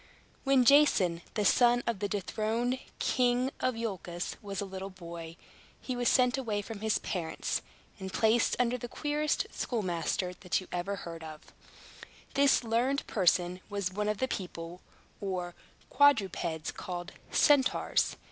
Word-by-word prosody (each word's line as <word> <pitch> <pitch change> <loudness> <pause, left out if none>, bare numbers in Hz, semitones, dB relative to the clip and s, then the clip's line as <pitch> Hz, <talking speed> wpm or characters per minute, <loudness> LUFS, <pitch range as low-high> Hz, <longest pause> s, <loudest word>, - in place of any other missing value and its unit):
When 270 -2 +4
Jason, 215 - +5
the 210 -2 +1
son 245 +4 +5
of 235 -4 -1
the 205 - -1
dethroned 220 +5 -1 0.2
King 250 +1 +2
of 255 -2 0
Iolchos, 190 -6 -4
was 200 -2 -5
a 200 - -1
little 190 0 -6
boy, 170 -3 -9 0.4
he 255 - -4
was 245 -1 +2
sent 255 0 +3
away 210 -5 -2
from 220 0 -7
his 220 0 +1
parents, 170 -5 -2 0.4
and 190 0 -6
placed 225 +4 +3
under 245 0 +1
the 240 - -5
queerest 295 +4 -1
schoolmaster 180 -4 -2
that 180 0 -1
ever 180 +3 -2
you - - -4
heard 165 -2 -7
of. 155 -1 -11 0.8
This 280 -2 +4
learned 240 +5 +1
person 180 -2 +2
was 200 -3 -2
one 210 +1 -1
of 210 - 0
the 260 - 0
people, 175 -5 -6 0.4
or 180 -3 -3 0.4
quadrupeds, 195 - +2
called 175 0 -6 0.2
Centaurs. 285 -3 +3
205 Hz, 145 wpm, -30 LUFS, 180-245 Hz, 0.8 s, Jason